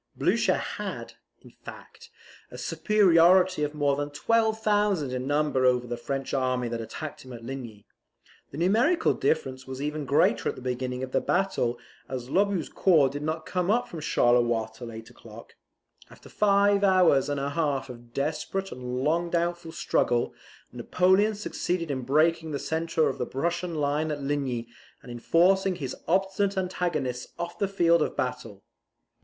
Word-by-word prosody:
Blucher - - +2
had, - - -5 0.3
in - - -15
fact, 465 -1 -13 0.4
a - - -10
superiority 185 -3 +4
of 150 0 -2
more 145 -2 +1
than 145 +1 -3
12,000 210 - +1
in 130 +1 -3
number 145 -2 +1
over 125 -1 +3
the 120 0 -4
French 135 +3 -4
army 130 -2 0
that 115 0 -4
attacked 145 +7 -7
him 130 - -12
at 115 -1 -10
Ligny. 120 -5 -8 0.6
The 140 - -9
numerical 230 - +3
difference 130 -4 -1
was 130 0 -6
even 150 +1 -3
greater 130 -4 +2
at - - -4
the - - -10
beginning 125 0 -3
of 130 - -5
the - - +1
battle, 175 -11 0 0.3
as 125 -1 -5
Lobau's 200 0 +1
corps 160 -8 +3
did 145 +2 -6
not 155 +1 -3
come 180 0 -1
up 235 +4 +2
from 165 - -8
Charleroi 120 -5 +2
till 120 0 -9
eight 110 0 -10
o'clock. - - -14 0.6
After - - -15
five 200 0 +3
hours 185 -8 +4
and 145 -1 -1
a 140 +1 -2
half 140 -4 -1
of 120 -2 -12
desperate 160 +8 -3
and 125 0 -4
long 170 +4 +1
doubtful 170 -1 -1
struggle, 120 -6 0 0.4
Napoleon 185 - +2
succeeded 180 -5 -3
in 130 -2 -2
breaking 160 +5 +2
the 145 - -2
centre 160 +1 0
of - - -3
the 125 - -2
Prussian 170 +4 -2
line 150 +1 0
at 150 -1 -3
Ligny, 135 -5 -2 0.4
and 120 - -10
in 120 - -7
forcing 190 +6 +3
his 135 -7 -5
obstinate 195 +2 +1
antagonists 170 -9 -2
off 175 0 -6
the 200 - +1
field 170 -4 +3
of - - -2
battle. 125 -7 -4
150 Hz, 165 wpm, -27 LUFS, 130-180 Hz, 0.6 s, superiority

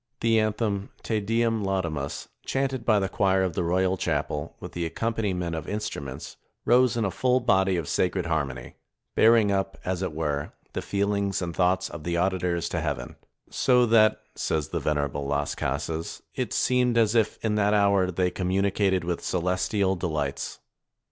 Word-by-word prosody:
The 115 -1 +4
anthem, 105 -2 -1
Te 110 -2 0
Deum 115 +1 0
laudamus, 80 -6 -2 0.2
chanted 135 -2 -1
by 110 -3 +4
the 95 -1 +1
choir 95 -1 +2
of 90 -3 -1
the - - -1
royal 95 +2 +1
chapel, 75 -4 -2
with - - -8
the 85 - -3
accompaniment 90 -2 -2
of 80 -1 -5
instruments, 75 -9 -5 0.3
rose 125 0 +4
in 115 - +1
a 95 - -1
full 125 +6 +2
body 95 -6 +2
of 80 -4 -3
sacred 90 -1 0
harmony; 70 -6 -3 0.4
bearing 110 -2 +5
up, 95 0 -1
as 90 0 -1
it 95 -3 -1
were, 75 -2 -2 0.2
the - - -2
feelings 100 0 0
and 85 -2 -4
thoughts 90 0 +2
of 85 - -8
the 85 +1 -1
auditors 90 -2 0
to 85 - -2
heaven, 70 -6 -3 0.4
"so 125 -1 +4
that," 110 -2 +4
says 75 -2 -1
the - - -2
venerable 70 -2 -1
Las 70 +1 -1
Casas, 80 0 -3
"it - - -3
seemed 125 -2 +2
as 110 -2 +4
if 110 -3 +2
in 110 - +1
that 105 0 +2
hour 100 -2 +3
they 90 0 0
communicated 95 0 +1
with 85 0 -3
celestial 95 +2 0
delights." 80 -6 -3
95 Hz, 170 wpm, -26 LUFS, 85-105 Hz, 0.4 s, bearing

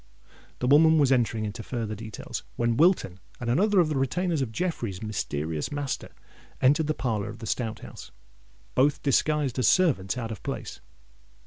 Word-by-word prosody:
The - - -3
woman 160 +4 +6
was 140 -3 +4
entering 115 -4 +1
into 105 +2 -5
farther 115 -2 -4
details, 110 0 -6
when 120 -1 +1
Wilton 155 - +3 0.2
and 120 -1 -1
another 200 - +3
of 170 - +4
the 155 - -1
retainers 165 +4 0
of 125 -4 -2
Jeffreys' 115 - -3
mysterious 80 -7 -3
master 145 -2 -3 0.5
entered 145 +4 +3
the 155 - 0
parlour 110 -5 -2
of 110 - -8
the - - -8
Stout 115 0 -2
House, - - -10 0.6
both 140 +3 +2
disguised 145 -2 +1
as 125 - +3
servants 130 - +3
out 115 -2 -4
of 105 - -7
place. - - -6
125 Hz, 165 wpm, -27 LUFS, 110-150 Hz, 0.6 s, woman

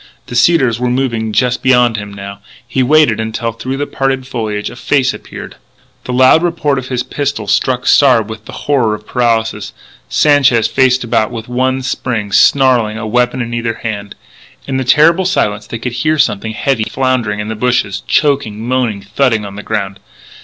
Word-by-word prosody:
The 120 - -8
cedars 125 -3 +3
were 125 0 0
moving 120 -4 -1
just 125 +4 0
beyond 125 -3 +3
him 105 -1 -6
now. 100 0 -8 0.3
He 130 - -1
waited 135 -4 +3
until, 110 +1 -3
through 130 +4 -5
the 145 - -2
parted 135 -2 -2
foliage, 110 -5 -4
a - - -11
face 130 0 +1
appeared. - - -10 0.5
The - - -4
loud 130 +5 +5
report 160 -5 0
of 130 - -8
his 125 -1 -2
pistol 140 -3 -3
struck 125 +5 0
Sard 125 -7 +4
with 110 -1 -9
the - - -10
horror 125 -7 +1
of 105 - -13
paralysis. 115 -2 -1 0.4
Sanchez 135 -6 +3
faced 130 -1 +2
about 115 -2 0
with 115 -1 -7
one 130 +1 -1
spring, 115 -5 -3
snarling, 120 -1 +3
a 115 - -5
weapon 125 +3 0
in 120 0 -6
either 115 -1 -2
hand. 100 -3 -5 0.5
In 135 -1 -2
the 130 - -1
terrible 160 +8 +4
silence 105 - -1
they 115 - -5
could 120 +1 -5
hear 155 +5 0
something 110 -4 0
heavy 120 -1 -1
floundering 125 -6 -1
in 105 +1 -4
the 110 - -3
bushes, 105 -4 0
choking, 120 -7 0
moaning, 120 -6 -1
thudding 110 +1 0
on 100 -1 -8
the 105 - -6
ground. 100 -3 -3
120 Hz, 180 wpm, -14 LUFS, 110-130 Hz, 0.5 s, loud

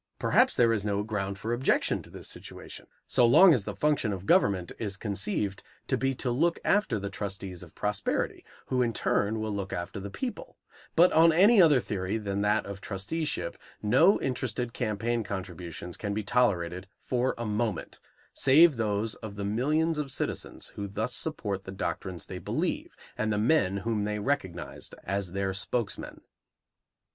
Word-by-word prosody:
Perhaps - - +3
there 115 -2 +4
is 105 -3 -1
no 100 -1 0
ground 100 -2 -3
for 110 +4 -3
objection 125 +3 +1
to - - -15
this - - -9
situation - - -9 0.2
so 125 - +3
long 155 +10 +8
as 115 -8 0
the - - -5
function 150 -7 +1
of 95 -1 -5
government 95 -4 +3
is 100 -4 -3
conceived 100 -1 -1 0.2
to - - 0
be 135 0 0
to 125 0 -1
look 165 +8 +2
after 200 - +2
the 100 0 -4
trustees 95 -2 -5
of 85 -3 -13
prosperity, 105 -1 -1 0.2
who 130 -1 0
in 120 -2 +1
turn 105 +1 0
will 110 0 -2
look 100 -1 -4
after 85 +4 -4
the 100 +1 -6
people; 245 - -6 0.4
but 175 +2 +6
on 165 +1 +7
any 200 +6 +6
other 150 -6 +6
theory 100 -2 -2
than 100 -2 -2
that 105 +1 +2
of 100 -1 -7
trusteeship 110 +13 -3 0.3
no 135 - +5
interested 125 -2 -2
campaign 115 0 -1
contributions 90 -3 -6
can 100 -1 -3
be 110 - -2
tolerated 95 -6 +1
for 125 +1 -1
a 120 - -4
moment, 105 -3 -2 0.3
save 145 +1 +6
those 110 0 0
of 110 -3 -8
the 100 -1 -4
millions 150 +9 +1
of 140 -3 -3
citizens - - -4
who 100 - -6
thus 110 +5 -3
support 105 -12 -2
the 95 - -8
doctrines 95 -3 -4
they - - -7
believe - - -2 0.2
and 110 0 -1
the 105 - 0
men 105 -4 +2
whom 105 +1 -1
they 105 0 -1
recognized 100 -7 -3
as 100 -2 -3
their 95 0 -1
spokesmen. 100 +3 -3
105 Hz, 170 wpm, -28 LUFS, 100-125 Hz, 0.4 s, long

